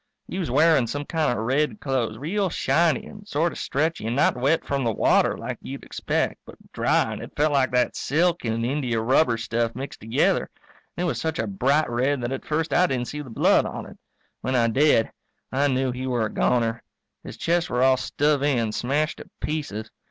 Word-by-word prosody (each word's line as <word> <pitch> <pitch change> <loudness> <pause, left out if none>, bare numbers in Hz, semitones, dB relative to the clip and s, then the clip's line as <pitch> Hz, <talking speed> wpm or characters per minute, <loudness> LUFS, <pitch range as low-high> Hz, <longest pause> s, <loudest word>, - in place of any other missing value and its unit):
He 185 - -4
was 175 - -2
wearing 145 -1 +4
some 145 +5 -4
kind 160 -3 0
of 115 -2 -2
red 135 -2 0
clothes, 125 -6 -1
real 190 - -1
shiny 165 -3 +1
and 205 0 -12
sort 165 +2 0
of - - -8
stretchy 150 -5 -1
and 115 - -1
not 145 - +3
wet 135 +6 +1
from 140 -2 -1
the 115 - +1
water, - - +2
like - - -5
you'd - - -7
expect, - - -2
but - - -13 0.2
dry - - +1
and - - -7
it - - -9
felt 150 +1 +3
like 135 -2 +3
that 125 -1 +1
silk 170 +4 +1
and 115 0 -1
India 125 -3 -1
rubber 120 +1 +3
stuff 115 0 -1
mixed 135 +3 -6
together. 110 +1 +1 0.5
And 175 - -1
it - - +1
was 125 -9 -1
such 160 +2 -2
a 110 - -1
bright 135 +10 +1
red 130 +4 0
that 120 +1 -3
at 135 - -4
first 160 +1 -1
I 180 - +4
didn't 125 -5 -2
see 150 - -5
the 140 - -10
blood 115 - +3
on - - -6
it. - - -13 0.4
When 130 - -2
I 115 -2 +3
did 130 -2 +3 0.4
I 140 +2 +2
knew 130 -1 +1
he 130 +1 -4
were 120 -3 0
a 105 - -5
goner. 115 -2 +1 0.4
His - - -9
chest 170 +1 0
were 125 +1 +1
all 130 0 +5
stove 145 +2 +1
in, 125 -6 +1
smashed 145 +7 -1
to - - -11
pieces. 140 -9 -4
135 Hz, 215 wpm, -24 LUFS, 120-150 Hz, 0.5 s, all